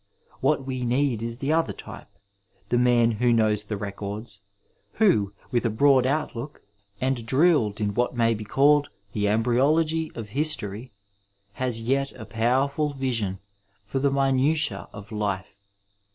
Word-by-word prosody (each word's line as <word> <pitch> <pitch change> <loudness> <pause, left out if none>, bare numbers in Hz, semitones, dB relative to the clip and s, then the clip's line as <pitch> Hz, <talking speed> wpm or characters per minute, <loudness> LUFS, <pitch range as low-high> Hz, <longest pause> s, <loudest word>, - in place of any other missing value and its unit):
What 135 - +1
we 130 -1 -3
need 125 -1 +1
is 115 0 -4
the 140 +4 -1
other 165 0 +1
type, - - -10 0.6
the 120 - +2
man 120 -1 +4
who 120 +2 +1
knows 110 -2 +2
the 105 0 -4
records, 100 +1 -6 0.5
who, 110 - +3 0.2
with 120 - +1
a 115 - +1
broad 130 +3 +4
outlook 140 -1 -3 0.4
and 130 -2 -1
drilled 130 - +2
in 105 -1 -1
what 120 +2 -1
may 115 -1 +3
be 110 -1 -5
called 145 +7 +3 0.2
the 105 -1 0
embryo 120 +6 +2
logy 160 0 0
of 110 -3 -7
history, 120 -4 -1 0.6
has 125 -1 0
yet 135 +3 0
a 110 -3 -9
powerful 130 +7 0
vision 115 -8 -2 0.5
for 105 +7 -3
the 140 +1 +2
minutiae 135 -3 +1
of 105 +2 -11
life. 100 -2 -3
120 Hz, 150 wpm, -25 LUFS, 105-135 Hz, 0.6 s, man